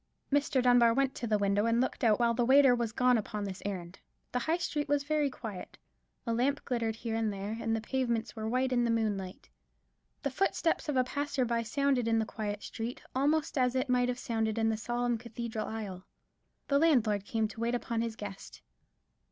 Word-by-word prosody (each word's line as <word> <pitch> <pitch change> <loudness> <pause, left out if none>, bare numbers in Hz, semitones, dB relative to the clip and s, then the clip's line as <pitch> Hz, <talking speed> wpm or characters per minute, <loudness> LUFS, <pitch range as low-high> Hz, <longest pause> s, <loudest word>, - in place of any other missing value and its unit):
Mr. 280 -3 +2
Dunbar 245 -2 +5
went 270 0 +2
to 235 - -4
the 215 -1 +2
window 205 +2 +1
and 230 +1 +2
looked 255 - -1
out 220 -1 +4
while 235 -1 +3
the 240 - +1
waiter 265 +1 +6
was 235 -2 -1
gone 250 0 +3
upon 210 0 -4
this 190 -2 -5
errand. 180 -2 -6 0.3
The 250 - 0
High 320 +7 0
Street 300 -4 -2
was 290 -1 +2
very 300 -1 +1
quiet, 215 -8 -8 0.5
a 230 - 0
lamp 260 +5 0
glimmered 230 -3 -1
here 230 0 -4
and 225 -1 0
there, 200 +2 -4
and 225 0 0
the 225 - -2
pavements 235 -1 -1
were 220 -1 -3
white 255 +2 +1
in 240 -1 +3
the 235 - +1
moonlight. 205 -5 -2 0.8
The 280 - -1
footstep 335 +1 0
of 285 - 0
a 255 - +5
passer 285 0 -1
by 235 -1 0
sounded 255 +1 +1
in 225 0 +3
the 220 - +1
quiet 210 -1 -4
street 230 +2 -5 0.2
almost 295 +2 +1
as 250 0 +2
it 260 +1 0
might 250 0 +3
have 245 - -1
sounded 225 -3 -1
in 225 0 +2
the 220 - +1
solemn 240 +1 -1
cathedral 230 -1 -5
aisle. 200 -5 -6 0.6
The 280 0 +3
landlord 235 -11 +3
came 220 +1 0
to 225 - -11
wait 235 +1 0
upon 235 -1 -2
his 230 -1 -3
guest. 205 -3 -9
235 Hz, 210 wpm, -31 LUFS, 220-255 Hz, 0.8 s, waiter